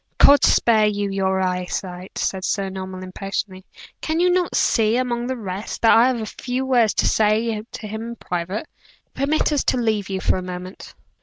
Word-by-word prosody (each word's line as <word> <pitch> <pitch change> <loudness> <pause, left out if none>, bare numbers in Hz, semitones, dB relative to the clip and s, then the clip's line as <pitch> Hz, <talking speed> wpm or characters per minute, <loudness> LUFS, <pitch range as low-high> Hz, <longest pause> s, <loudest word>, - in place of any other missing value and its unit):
"God 285 -2 +7
spare 220 -2 +4
you 205 -1 -1
your 190 -1 0
eye 180 -1 -1
sight!" 180 0 -6
said 190 -1 -2
Sir 195 0 -1
Norman, 190 -1 -7
impatiently. 190 0 -5 0.4
"Can 315 +1 -1
you 360 +1 +4
not 360 -1 0
see, 220 +1 +2
among 240 -1 -1
the 260 0 -3
rest, 200 0 -6
that 225 - +7
I 235 +2 +6
have 255 -2 0
a 220 - -3
few 250 +4 -4
words 240 -5 +3
to - - +2
say 215 0 +1
to 215 - -7
him 220 +1 -5
in 235 +1 -6
private? 180 - -4 0.5
Permit 290 +3 0
us 290 - +1
to - - +2
leave 220 -5 0
you 190 -1 -2
for 185 - +1
a - - -3
moment." 180 +1 -8
215 Hz, 200 wpm, -21 LUFS, 190-240 Hz, 0.5 s, God